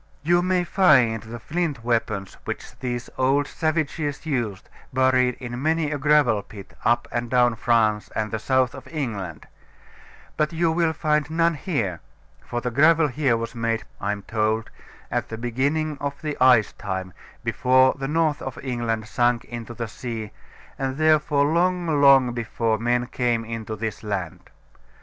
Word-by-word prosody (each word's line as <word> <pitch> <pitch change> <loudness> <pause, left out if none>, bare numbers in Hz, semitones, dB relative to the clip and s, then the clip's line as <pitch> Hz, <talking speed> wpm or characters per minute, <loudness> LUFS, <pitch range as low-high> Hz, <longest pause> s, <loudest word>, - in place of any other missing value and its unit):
You 175 +3 +3
may 180 0 +1
find 140 - +4
the 115 +2 -8
flint 145 +1 -3
weapons 110 -5 -1
which - - -6
these 120 -2 -3
old 135 +2 +3
savages 155 -1 -2
used 120 -10 -2 0.2
buried 130 -1 +3
in 120 -1 -6
many 160 0 +1
a 145 - -2
gravel 145 -7 +3
pit 100 -1 -12
up 120 0 +2
and 120 0 -2
down 120 -1 +4
France 110 -2 +1
and 110 -1 -1
the 110 - -2
south 130 +2 +1
of 130 -1 -10
England; 105 - -5 0.9
but 155 +2 0
you 165 0 +2
will 165 -1 +1
find 150 -2 0
none 165 +1 +2
here, 115 - -2 0.4
for 120 -1 -4
the 125 - -2
gravel 155 +4 +4
here 130 -3 +1
was 115 0 -5
made 115 -2 -1 0.2
(I 100 - 0
am 100 -1 -5
told) 110 +1 -1 0.4
at - - -1
the 115 - -5
beginning 140 +6 -1
of 140 0 -4
the 150 -2 -2
ice 125 -4 +5
time, 95 -2 -5 0.3
before 130 +1 +4
the 135 -1 -5
north 155 -1 +1
of 135 - -6
England 120 -4 -2
sunk 120 -1 +1
into 120 0 -7
the 115 0 -4
sea, 115 -1 -6 0.5
and 135 0 -2
therefore 150 -2 +3
long, 170 -1 +1
long 135 -3 +6
before 115 -2 -1
men 120 +1 +1
came 120 -2 -1
into 110 -1 -5
this 110 0 -4
land. 95 -6 -5
125 Hz, 160 wpm, -24 LUFS, 115-150 Hz, 0.9 s, long